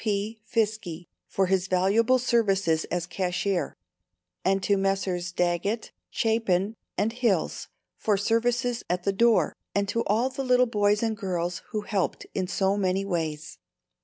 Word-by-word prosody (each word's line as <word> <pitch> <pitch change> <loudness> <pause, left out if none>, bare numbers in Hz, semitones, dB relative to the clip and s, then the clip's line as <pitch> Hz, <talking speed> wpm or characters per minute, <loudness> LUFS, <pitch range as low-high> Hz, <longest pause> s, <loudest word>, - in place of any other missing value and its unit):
P. 215 +1 -1
Fiske 215 -7 -1 0.2
for 195 - +1
his 185 0 +1
valuable 200 +7 +3
services 195 -9 +2
as 175 -1 -2
cashier, 180 +1 -1 0.7
and 195 0 +1
to 200 - +3
Messrs. 195 -2 -1
Daggett, 180 +5 -1 0.2
Chapin 220 -2 +1 0.2
and 220 +2 +1
Hills 235 -8 0 0.3
for 210 -2 +1
services 235 +3 +1
at 180 0 -1
the 200 - +1
door; 230 +2 +3 0.2
and 200 0 +1
to 230 +2 0
all 230 +6 +1
the 270 +1 -4
little 250 -1 +4
boys 210 -2 +2
and 225 -1 0
girls 180 -4 -2
who 215 - -2
helped 205 -3 -2
in 185 -1 -1
so 195 +2 +1
many 190 0 0
ways. 160 -5 -3
200 Hz, 145 wpm, -26 LUFS, 180-225 Hz, 0.7 s, little